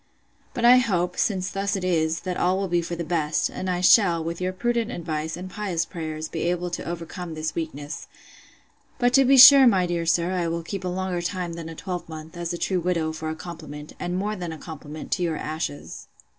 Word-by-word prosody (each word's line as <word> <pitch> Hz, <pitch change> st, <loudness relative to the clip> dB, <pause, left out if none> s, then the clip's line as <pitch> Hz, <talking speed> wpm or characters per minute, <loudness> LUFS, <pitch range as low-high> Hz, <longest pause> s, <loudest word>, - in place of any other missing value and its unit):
But 235 Hz, -, 0 dB
I 245 Hz, +1 st, +9 dB
hope, 180 Hz, -7 st, +1 dB
since 190 Hz, -2 st, 0 dB
thus 200 Hz, +1 st, -1 dB
it 190 Hz, -, -3 dB
is, 160 Hz, -3 st, +1 dB
that 185 Hz, -1 st, -3 dB
all 180 Hz, +2 st, +1 dB
will 195 Hz, 0 st, -1 dB
be 175 Hz, -1 st, +1 dB
for 170 Hz, +1 st, -4 dB
the 170 Hz, -, -4 dB
best; 160 Hz, -2 st, 0 dB
and 185 Hz, -, -4 dB
I 180 Hz, -1 st, -1 dB
shall, 175 Hz, -4 st, +5 dB
with 170 Hz, +2 st, -4 dB
your 185 Hz, 0 st, 0 dB
prudent 235 Hz, +4 st, -1 dB
advice, 160 Hz, -4 st, -4 dB
and 180 Hz, +1 st, -6 dB
pious 185 Hz, -4 st, -2 dB
prayers, 155 Hz, -2 st, -5 dB
be 165 Hz, -, -5 dB
able 175 Hz, 0 st, -2 dB
to -, -, -4 dB
overcome 170 Hz, 0 st, -6 dB
this 155 Hz, 0 st, -3 dB
weakness.—But, 160 Hz, -, -6 dB
to 270 Hz, 0 st, +6 dB
be 270 Hz, +1 st, +5 dB
sure, 265 Hz, +1 st, +11 dB
my 190 Hz, -6 st, +4 dB
dear 170 Hz, -1 st, -2 dB
sir, 170 Hz, +2 st, +2 dB
I 180 Hz, -2 st, -1 dB
will 165 Hz, 0 st, -2 dB
keep 195 Hz, +3 st, -5 dB
a -, -, -2 dB
longer 180 Hz, -1 st, -2 dB
time 175 Hz, -1 st, -3 dB
than 165 Hz, -1 st, -7 dB
a 165 Hz, -, -8 dB
twelvemonth, 165 Hz, -2 st, -7 dB
as 170 Hz, 0 st, -4 dB
a 175 Hz, -, -3 dB
true 185 Hz, +1 st, 0 dB
widow, 165 Hz, -2 st, -1 dB
for 160 Hz, 0 st, -5 dB
a 160 Hz, -, -3 dB
compliment, 155 Hz, -3 st, -9 dB
and 175 Hz, +1 st, -2 dB
more 210 Hz, +3 st, -2 dB
than 175 Hz, -4 st, -5 dB
a 160 Hz, -, -7 dB
compliment, 155 Hz, -1 st, -9 dB
to 185 Hz, -, 0 dB
your 165 Hz, -3 st, 0 dB
ashes! 155 Hz, -2 st, -5 dB
175 Hz, 220 wpm, -24 LUFS, 160-185 Hz, -, sure